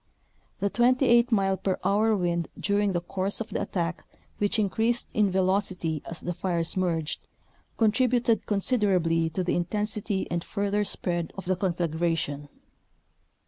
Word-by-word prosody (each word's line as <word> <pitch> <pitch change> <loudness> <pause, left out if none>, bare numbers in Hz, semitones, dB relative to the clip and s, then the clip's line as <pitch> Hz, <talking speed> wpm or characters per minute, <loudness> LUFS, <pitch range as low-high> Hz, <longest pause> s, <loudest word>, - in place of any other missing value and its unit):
The 200 0 +1
28 245 0 +4
mile 195 -3 +2
per 190 -1 -1
hour 215 +2 +3
wind 170 -2 -1
during 205 -1 +1
the 175 - 0
course 190 +3 -2
of 225 - -4
the - - -2
attack 175 -2 -2 0.4
which 205 +1 +2
increased 225 +3 +1
in 210 -2 +3
velocity 185 -4 0
as 170 - -6
the 175 - -3
fires 170 -1 -1
merged, 170 -4 -2 0.5
contributed 235 +1 +2
considerably 190 -7 +2
to 185 +3 -2
the 180 - 0
intensity 205 +2 -1
and 170 -1 -1
further 205 0 -1
spread 175 -4 -1
of 195 - -6
the 185 +1 +1
confla 175 -2 -1
gration. 160 -3 -2
190 Hz, 140 wpm, -27 LUFS, 170-210 Hz, 0.5 s, 28